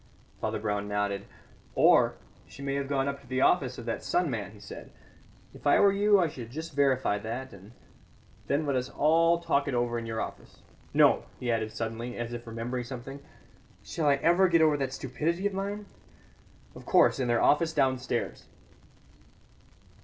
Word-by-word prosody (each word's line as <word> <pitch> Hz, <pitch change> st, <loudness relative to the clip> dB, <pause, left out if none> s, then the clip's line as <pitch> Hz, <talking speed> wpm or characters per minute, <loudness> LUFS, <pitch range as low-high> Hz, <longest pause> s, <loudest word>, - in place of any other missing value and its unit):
Father -, -, -1 dB
Brown 105 Hz, -1 st, -2 dB
nodded. 100 Hz, -1 st, -2 dB, 0.5 s
"Or, -, -, +5 dB, 0.3 s
she 140 Hz, -, -11 dB
may 140 Hz, 0 st, -2 dB
have 140 Hz, 0 st, -2 dB
gone 135 Hz, -1 st, 0 dB
up 140 Hz, 0 st, -4 dB
to 135 Hz, -, -19 dB
the 130 Hz, +1 st, -1 dB
office 130 Hz, -7 st, +2 dB
of 120 Hz, -, -8 dB
that 115 Hz, -, -3 dB
sun 175 Hz, -4 st, 0 dB
man," 105 Hz, -5 st, -3 dB
he 105 Hz, 0 st, -15 dB
said. 100 Hz, -, -10 dB, 0.6 s
"If -, -, -6 dB
I 145 Hz, -, +5 dB
were 200 Hz, -, +6 dB
you 205 Hz, +1 st, +4 dB
I 175 Hz, -, +3 dB
should 125 Hz, -6 st, -8 dB
just 160 Hz, +5 st, -7 dB
verify 130 Hz, -6 st, +2 dB
that, 120 Hz, +5 st, -6 dB
and 100 Hz, +2 st, -14 dB, 0.8 s
then 145 Hz, +2 st, 0 dB
let 140 Hz, -2 st, 0 dB
us 125 Hz, 0 st, -1 dB
all 165 Hz, +3 st, +3 dB
talk 160 Hz, -4 st, 0 dB
it 135 Hz, -, -1 dB
over 120 Hz, -1 st, 0 dB
in 115 Hz, -, -7 dB
your 110 Hz, 0 st, -3 dB
office. -, -, -8 dB, 0.3 s
No," -, -, +4 dB
he 120 Hz, -1 st, -1 dB
added 110 Hz, -1 st, -1 dB
suddenly, 115 Hz, +2 st, -5 dB
as 120 Hz, 0 st, -4 dB
if 120 Hz, 0 st, -7 dB
remembering 115 Hz, +2 st, -4 dB
something, 130 Hz, +2 st, -8 dB, 0.6 s
"shall 160 Hz, -2 st, -2 dB
I 140 Hz, -, +5 dB
ever 175 Hz, +6 st, +4 dB
get 165 Hz, -2 st, +4 dB
over 155 Hz, -2 st, +4 dB
that 135 Hz, -2 st, -2 dB
stupidity 155 Hz, +8 st, -2 dB
of 205 Hz, -, +1 dB
mine? 200 Hz, +2 st, -4 dB, 0.9 s
Of -, -, -12 dB
course, -, -, +4 dB
in 130 Hz, -, 0 dB
their 120 Hz, -1 st, +2 dB
office 160 Hz, +2 st, +3 dB
downstairs." 130 Hz, -4 st, -1 dB
130 Hz, 185 wpm, -28 LUFS, 115-155 Hz, 0.9 s, were